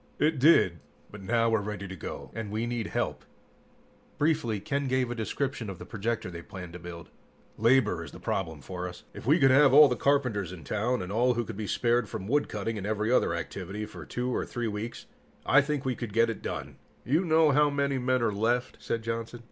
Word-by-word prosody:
"It 150 -1 +2
did, 125 - +5 0.3
but 105 - -10
now 115 +3 +2
we're 110 -2 +2
ready 100 -1 -5
to 95 - -7
go, 85 - -7
and 110 -2 -5
we 110 +3 -2
need 120 -2 -2
help." - - -2 0.9
Briefly, 145 -8 +1
Ken 140 +7 -2
gave 130 -1 +1
a - - 0
description 120 0 -3
of 95 - -6
the - - -9
projector 110 -3 -3
they 85 -1 -7
planned 90 0 -9
to 90 - -7
build. 85 -1 -9 0.4
"Labor 115 -7 +3
is - - -10
the - - -11
problem 80 -6 -3
for 90 +5 -5
us. 90 - -12
If - - -9
we 150 +5 +6
could 135 -5 +5
have 135 0 +6
all 150 0 +10
the 125 - 0
carpenters 125 - +1
in 90 -4 -9
town, 110 - -1
and 90 - -6
all 120 +3 +2
who 120 0 -1
could 110 - -7
be 105 0 -4
spared 120 +3 +1
from 105 -4 -5
woodcutting 115 -5 -1
and 100 - -4
every 110 +1 0
other 85 -9 +3
activity 95 +4 -5
for 105 - -10
2 125 0 -2
or - - 0
3 120 -1 -3
weeks 110 +2 -5 0.4
I 145 - +6
think 140 0 -2
we 130 - +1
could 120 -4 -6
get 115 +1 +3
it 110 - -8
done." - - -5 0.3
"You 150 +9 +2
know 160 -3 +4
how 150 +1 +4
many 140 -1 0
men 130 0 +1
are 110 - +1
left," 115 +4 0
said 115 -1 -2
Johnson. 115 +1 -4
115 Hz, 220 wpm, -28 LUFS, 100-130 Hz, 0.9 s, all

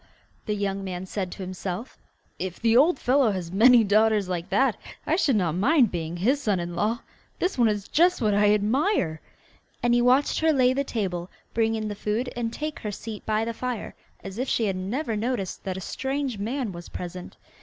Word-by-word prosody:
the 210 - 0
young 200 -1 -2
man 185 -1 -5
said 185 -1 -4
to 195 - -7
himself, 185 +4 -5 0.4
'if 185 -2 -4
the 225 0 +3
old 290 +5 +5
fellow 260 -1 +3
has 175 -3 -5
many 235 +4 +6
daughters 215 -1 +3
like 180 0 -3
that 235 +5 +3 0.3
I 315 - +2
should 290 -8 +2
not 180 -6 +1
mind 245 - +3
being 170 -1 -4
his 260 +11 +1
son 205 -7 +1
in 175 0 -4
law. 225 +7 0 0.4
This 365 - -1
one 240 -2 +4
is 205 -2 -2
just 355 +3 +3
what 215 -4 +2
I 205 0 +4
admire'; 210 - +1 0.6
and 240 0 +3
he 240 - +4
watched 255 +4 +3
her 320 0 +3
lay 255 -3 +4
the 280 +1 0
table, 185 -8 -3 0.2
bring 225 0 +1
in 215 -1 -3
the 210 - -3
food, 215 +5 -2
and 235 -1 -2
take 305 +4 -5
her 210 - -4
seat 210 +1 -7
by 215 0 +1
the 230 - -3
fire 250 -1 -4 0.3
as 195 +3 -7
if 255 - -1
she 230 - +1
had 195 -2 0
never 225 +7 -2
noticed 215 -3 -2
that 190 -1 -3
a - - -6
strange 265 +2 -3
man 235 +2 -2
was 170 -1 -9
present. 180 0 -7
215 Hz, 210 wpm, -25 LUFS, 190-250 Hz, 0.6 s, many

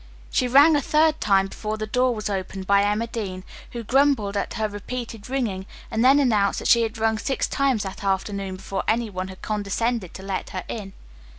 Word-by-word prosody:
She 250 - +2
rang 285 +5 +7
a 290 - +2
third 310 +2 +2
time 195 -2 +3
before 215 +2 -4
the 215 - -3
door 250 +2 +1
was 215 -1 -4
opened 190 -1 -4
by 200 +1 +4
Emma 210 +3 +1
Dean, 200 -6 -5 0.3
who 235 -1 -5
grumbled 255 -4 +2
at 200 - -2
her 220 -2 0
repeated 225 +2 -6
ringing 215 -8 -2 0.2
and 225 - +1
then 265 +2 +6
announced 215 -7 +2
that - - -2
she 235 - +6
had 225 0 -2
rung 220 0 +1
six 270 - -1
times 270 -6 +1
that 195 0 -7
afternoon 195 0 -1
before 195 +1 -4
any 230 -1 +1
one 185 0 -4
had 190 0 -12
condescended 210 0 -2
to 190 - -8
let 195 -1 -3
her 185 - -5
in. 200 -4 -6
215 Hz, 205 wpm, -24 LUFS, 195-245 Hz, 0.3 s, rang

